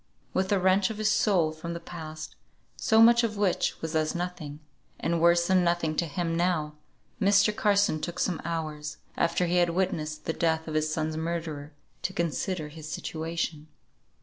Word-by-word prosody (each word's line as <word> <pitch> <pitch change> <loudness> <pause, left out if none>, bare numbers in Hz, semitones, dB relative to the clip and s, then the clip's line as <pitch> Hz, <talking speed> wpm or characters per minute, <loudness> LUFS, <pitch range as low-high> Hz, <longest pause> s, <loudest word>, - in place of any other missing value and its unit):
With 190 +1 0
a 200 - +4
wrench 190 +2 +3
of 220 - -5
his 215 0 +2
soul 185 -7 +3
from 160 +2 -6
the - - -4
past, 155 -2 -8 0.4
so 220 0 +5
much 235 +1 +6
of 215 -2 -1
which 200 -3 +1
was 160 0 -3
as 155 +1 +1
nothing, 175 -4 -5 0.4
and 165 0 0
worse 170 0 +5
than 185 0 +3
nothing 170 -2 +1
to 170 - +1
him 165 +2 -2
now, 165 -3 0 0.5
Mr. 200 +2 +4
Carson 200 -7 +2
took 175 0 -4
some 180 -2 -1
hours, 155 -2 -4 0.2
after 170 +1 +1
he 175 +1 +1
had 175 -1 +4
witnessed 155 -4 -2
the 160 - -1
death 160 -1 0
of 155 - -4
his 155 0 +1
son's 155 0 -2
murderer, 160 -3 -4 0.3
to 190 - -2
consider 170 -1 -2
his 155 0 -9
situation. 160 -1 -4
170 Hz, 175 wpm, -28 LUFS, 155-185 Hz, 0.5 s, much